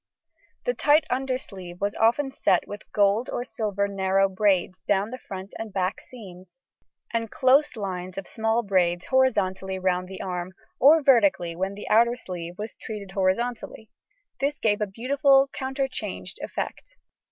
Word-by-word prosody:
The - - +1
tight 300 -4 +3
undersleeve 245 -9 -4
was 200 +1 -1
often 240 +5 +2
set - - +1
with 205 - -9
gold 205 +4 +2
or 245 - -2
silver 210 -4 -2
narrow 195 0 +2
braids 190 -2 +1
down 205 +2 0
the 255 - -6
front 190 -2 -8
and 225 -1 -5
back 190 0 -1
seams, 190 -7 -12 0.6
and 230 -1 -1
close 270 +4 +3
lines 185 -3 -5
of 195 - -4
small 225 +3 0
braids 180 -3 +1
horizontally 190 -8 +1
round 185 -1 0
the 190 0 -9
arm, 180 0 -4 0.3
or 300 +4 +6
vertically 200 -10 +3
when 190 +3 -2
the 205 - -8
outer 235 +2 +4
sleeve 175 -6 -7
was 215 +2 -6
treated 205 -3 -7
horizontally, 220 +4 -2 0.5
this 285 +2 0
gave 210 -1 +1
a 210 - +1
beautiful 270 +5 +3
counterchanged 260 -8 -4
effect. - - -5
205 Hz, 150 wpm, -25 LUFS, 190-250 Hz, 0.6 s, or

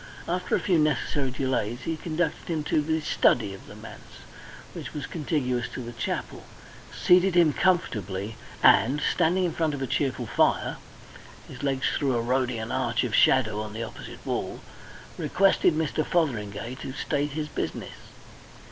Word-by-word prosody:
After 180 +1 0
a - - +1
few 175 -4 +2
necessary 145 -2 +1
delays, 125 -2 -1
he 165 +5 -2
conducted 160 +1 -2
him 155 -2 -1
to 150 0 +1
the 160 +1 0
study 110 -8 +2
of 95 - -12
the - - -11
manse, - - -12 0.5
which - - -7
was 145 - -3
contiguous 135 -7 -1
to 125 - -5
the 120 - -7
chapel, 120 - -4 0.5
seated 180 +1 +4
him 165 -4 +5
comfortably, 105 - 0 0.3
and, 130 +9 +5
standing 180 +2 +2
in 175 - +1
front 155 -3 0
of 140 - -6
a - - 0
cheerful 130 -2 -1
fire - - +1 0.7
his - - -10
legs 135 -1 0
threw 135 -4 +1
a - - +1
Rhodian 120 -2 -1
arch - - 0
of - - -3
shadow 110 -5 +4
on 105 -1 -6
the 115 +1 -4
opposite 115 - -9
wall - - -3 0.6
requested 195 -4 +3
Mr. 155 0 0
Fotheringay 120 - -1
to 130 - -5
state 145 +1 -1
his 155 0 -3
business. - - -5
140 Hz, 160 wpm, -26 LUFS, 120-160 Hz, 0.7 s, him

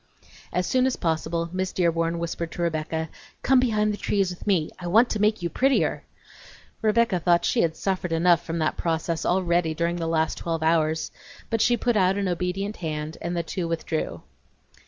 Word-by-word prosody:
As 180 +1 0
soon 255 +4 +2
as 260 - 0
possible 165 0 -1
Miss 185 0 -1
Dearborn 165 -1 +1
whispered 170 0 -4
to 175 - -3
Rebecca: 160 -1 -2 0.4
"Come 265 -1 +5
behind 215 -4 +1
the - - -5
trees 195 -3 0
with 180 - -10
me; 175 -6 +2
I 175 - -5
want 225 +7 +4
to 215 - -1
make 210 -3 +2
you 170 - 0
prettier!" 270 +1 +1 0.8
Rebecca 220 -3 +2
thought 175 0 +3
she - - +2
had 160 -1 +1
suffered 185 -3 -2
enough 170 +1 +3
from 165 0 -4
that 155 -1 0
process 165 0 -1
already 175 -3 +1
during 170 +1 0
the 165 -1 -2
last 160 -1 0
twelve 165 -1 -2
hours, 160 -1 +1 0.4
but 225 -1 +1
she 240 +1 +3
put 240 -1 0
out 190 -1 +3
an 200 -1 0
obedient 180 +4 -2
hand 155 -1 -4
and 170 +1 -3
the 170 - 0
two 170 +1 -3
withdrew. 165 -1 -3
175 Hz, 190 wpm, -25 LUFS, 165-195 Hz, 0.8 s, Come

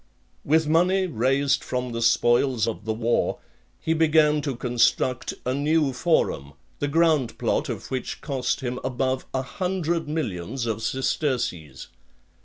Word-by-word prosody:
With 160 +2 +2
money 180 +4 +3
raised 135 -1 +1
from 125 -1 -3
the 115 0 -3
spoils 120 +1 +3
of 110 -2 -4
the 110 - 0
war, 115 +1 0 0.4
he 160 - 0
began 155 -2 +3
to 140 -3 -3
construct 125 +1 +1
a 125 - 0
new 145 0 +1
forum, 125 - 0 0.3
the 145 - 0
ground 155 -4 +2
plot - - 0
of - - -6
which 130 -2 -3
cost 135 -1 -2
him 125 -1 -3
above 130 0 -1
a 130 - -1
hundred 170 +4 -2
millions 120 - -3
of 110 -1 -2
sesterces. 120 - -2
130 Hz, 140 wpm, -24 LUFS, 120-155 Hz, 0.4 s, money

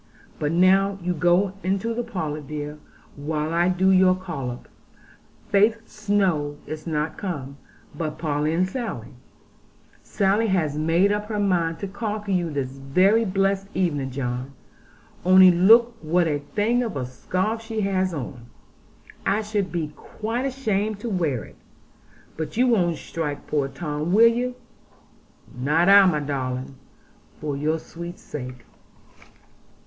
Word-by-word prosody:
But 150 0 0
now 190 +3 +4
you 180 +1 0
go 175 +4 +2
into 195 +5 -1
the 240 - -2
parlour, 160 -10 -4
dear, 150 +1 -6 0.4
while 150 +2 -3
I 175 +1 +3
do 185 +1 +3
your 185 -1 +5
collop. 140 -10 -6 0.8
Faith 220 +3 +3
Snowe 190 -9 0
is 155 +1 -7
not 155 -1 -2
come, 145 -8 -5 0.4
but 155 -3 -4
Polly 150 -1 -1
and 180 +3 +1
Sally. 190 - -5 0.9
Sally 205 +3 +1
has 165 -7 0
made 165 +6 +2
up 210 0 -1
her 215 -1 -3
mind 175 -5 +1
to 200 - -2
conquer 210 0 -4
you 175 -3 +1
this 140 -4 -3
very 180 +12 +2
blessed 195 0 0
evening, 145 -8 0
John. 125 0 -4 0.7
Only 185 0 +8
look 225 +7 +5
what 170 +2 +2
a 145 -2 0 0.2
thing 230 +4 +2
of 225 -10 -3
a 130 - -2
scarf 185 - -2
she 225 -1 -4
has 190 -2 0
on; 125 -6 -6 0.8
I 210 +2 +1
should 205 -3 -2
be 165 -4 -2
quite 230 +4 -4
ashamed 215 -6 -1
to 235 - -3
wear 160 - -1
it. - - -15 0.8
But 160 +6 -5
you 250 - +4
won't 180 -9 +2
strike 150 -3 -5
poor 145 -3 0
Tom, 150 +4 -3
will 225 +3 +7
you?' 245 +2 +2 1.0
'Not 150 +8 +2
I, 200 0 +9
my 155 -5 +1
darling, 130 -2 -3 0.7
for 150 -2 -3
your 155 +3 0
sweet 170 +2 -9
sake.' 125 -4 -8
175 Hz, 145 wpm, -24 LUFS, 150-200 Hz, 1.0 s, I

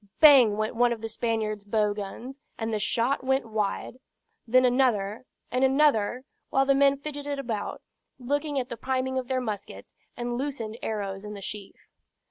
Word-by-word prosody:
Bang 260 -9 +8
went 215 +1 -1
one 240 +1 +3
of 230 -2 -3
the 225 - -3
Spaniard's 220 -2 -2
bow 210 0 +1
guns, 225 +7 -7 0.2
and 225 -1 -3
the 215 - 0
shot 240 +6 0
went 265 0 +1
wide. 215 +2 -3 0.5
Then 255 +2 +5
another 245 -4 +1 0.3
and 255 +1 +1
another, 265 -4 +3 0.3
while 270 0 +3
the 275 - +4
men 275 0 +4
fidgeted 290 0 -5
about, 230 -6 -4 0.3
looking 285 +3 -1
at 250 - -4
the 235 - -5
priming 260 +1 -1
of 255 - -6
their 260 0 0
muskets, 210 -4 -6 0.2
and 240 0 -3
loosened 240 -5 -4
arrows 200 -3 -3
in 210 0 -7
the - - -7
sheaf. 205 -1 -6
240 Hz, 170 wpm, -27 LUFS, 215-265 Hz, 0.5 s, Bang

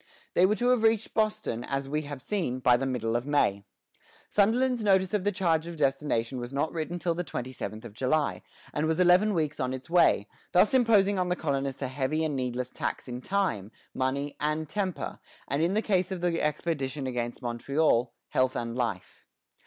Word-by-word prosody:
They 180 - +5
were 210 - +2
to 245 +2 +1
have 250 -2 +3
reached 225 -1 +2
Boston, 215 - 0
as 135 +1 -3
we 150 +2 -1
have 140 -3 -7
seen, 175 -12 -1
by 125 -1 +4
the 135 +2 -1
middle 115 -3 -1
of 120 +3 -1
May. 100 -9 +2 0.7
Sunderland's 235 +4 +2
notice 190 -2 +3
of 210 -3 +1
the 205 - +3
change 165 -4 +1
of 170 -1 -7
destination 135 -4 0
was 120 +1 -6
not 140 +3 -1
written 170 +1 -3
till 170 0 0
the 175 +2 -3
twenty 130 -6 -5
seventh 110 -3 -6
of - - -9
July, 140 +6 0 0.3
and 150 +1 0
was 160 +1 0
eleven 180 +4 +5
weeks 150 -3 -1
on 130 0 -1
its 130 +4 -8
way, 170 - +4 0.3
thus 180 +7 +5
imposing 210 -6 +4
on 180 -1 0
the 180 - +1
colonists 140 -4 -2
a - - 0
heavy 135 +4 -1
and 155 -3 -1
needless 125 -1 -2
tax - - -4
in 125 0 -5
time, 155 - -1 0.2
money, 140 +2 -1 0.3
temper, 185 +3 -3 0.3
and, 140 +2 0
in 175 +4 +1
the 215 - +1
case 185 -3 +1
of 185 -2 -3
the 175 -1 0
expedition 150 -2 -2
against 120 0 -3
Montreal, 120 +1 +1 0.2
health 130 0 +1
and 115 0 -3
life. 115 -7 -4
150 Hz, 195 wpm, -28 LUFS, 130-185 Hz, 0.7 s, They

